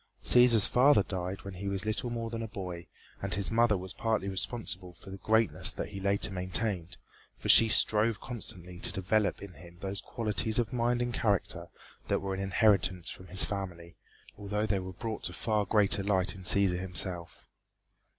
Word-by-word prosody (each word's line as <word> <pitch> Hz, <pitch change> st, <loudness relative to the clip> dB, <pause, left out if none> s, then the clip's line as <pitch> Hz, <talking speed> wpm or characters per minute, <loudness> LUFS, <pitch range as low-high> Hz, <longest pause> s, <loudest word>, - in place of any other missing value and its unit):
Cæsar's 120 Hz, -4 st, +6 dB
father 125 Hz, -4 st, +4 dB
died 95 Hz, 0 st, -5 dB
when 100 Hz, -, -7 dB
he 95 Hz, +2 st, -6 dB
was 100 Hz, 0 st, -2 dB
little 110 Hz, +3 st, -2 dB
more 115 Hz, -1 st, -4 dB
than 115 Hz, -1 st, -4 dB
a 115 Hz, -, -4 dB
boy 90 Hz, -5 st, -7 dB, 0.3 s
and -, -, -2 dB
his 100 Hz, +2 st, 0 dB
mother 115 Hz, -2 st, +3 dB
was 95 Hz, 0 st, -5 dB
partly 110 Hz, -4 st, -1 dB
responsible 95 Hz, -2 st, -3 dB
for 95 Hz, -, -13 dB
the 95 Hz, -, -7 dB
greatness 110 Hz, +3 st, +1 dB
that -, -, -5 dB
he 100 Hz, -, -7 dB
later 100 Hz, +1 st, +1 dB
maintained, 90 Hz, -1 st, -2 dB, 0.4 s
for -, -, -6 dB
she 115 Hz, -, +7 dB
strove 105 Hz, 0 st, +3 dB
constantly 90 Hz, -7 st, -8 dB
to -, -, 0 dB
develop 100 Hz, +2 st, 0 dB
in 100 Hz, -3 st, -10 dB
him 85 Hz, +3 st, -15 dB
those 100 Hz, 0 st, -4 dB
qualities 110 Hz, 0 st, 0 dB
of 120 Hz, -1 st, -1 dB
mind 120 Hz, 0 st, 0 dB
and 120 Hz, 0 st, -3 dB
character 100 Hz, -6 st, -1 dB, 0.4 s
that -, -, +1 dB
were 95 Hz, 0 st, -4 dB
an 95 Hz, -, -4 dB
inheritance 95 Hz, -2 st, +1 dB
from 95 Hz, -, -11 dB
his 95 Hz, +2 st, +5 dB
family, 90 Hz, -4 st, -6 dB, 0.4 s
although 105 Hz, +1 st, -2 dB
they 100 Hz, -2 st, 0 dB
were 95 Hz, 0 st, -7 dB
brought 110 Hz, +4 st, -5 dB
to -, -, -3 dB
far 105 Hz, -3 st, -1 dB
greater 105 Hz, -1 st, +3 dB
light 95 Hz, -2 st, +1 dB
in 95 Hz, -, -11 dB
Cæsar 95 Hz, -1 st, +3 dB
himself. 90 Hz, -2 st, -1 dB
100 Hz, 185 wpm, -30 LUFS, 95-110 Hz, 0.4 s, she